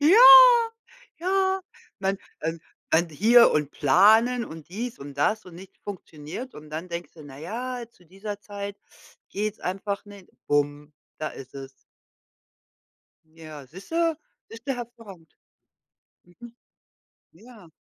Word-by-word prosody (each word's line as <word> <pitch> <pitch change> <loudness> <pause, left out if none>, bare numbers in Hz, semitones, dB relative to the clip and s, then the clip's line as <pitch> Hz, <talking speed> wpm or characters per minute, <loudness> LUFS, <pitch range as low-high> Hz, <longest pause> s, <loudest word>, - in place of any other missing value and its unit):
Ja, 325 +9 +6 1.0
ja. 380 +1 +1 0.4
Man, 195 0 -1 0.2
ähm 165 0 -3 0.3
man 170 +1 +3
hier 225 +10 +6
und 150 -1 0
planen 220 - +4
und 160 -5 -11
dies 230 +6 -5
und 140 0 -9
das 215 +8 0
und 180 - -12
nichts 190 +2 -14
funktioniert 185 - -8
und 150 0 -12
dann 165 +4 -6
denkst 170 +1 -6
du: 155 - -13
„Na 135 -1 -12
ja, 240 +7 -5
zu 180 - -25
dieser 195 +4 -7
Zeit 200 -1 -7 0.5
geht's 210 +1 -3
einfach 195 +2 -4
nicht.“ 200 -3 -14 0.2
Bum, 145 +1 -1 0.3
da 155 - -3
ist 130 -1 -12
es. 135 -1 -11 1.4
Ja, 155 -3 -12
siehst 185 +8 -13
du 330 -1 +1 0.3
siehst 230 +2 -13
du, 270 - 0
hervorragend. 220 -9 -11 0.9
Mhm. 230 +7 -15 0.8
Ja. 215 0 -16
195 Hz, 130 wpm, -25 LUFS, 155-230 Hz, 1.4 s, Ja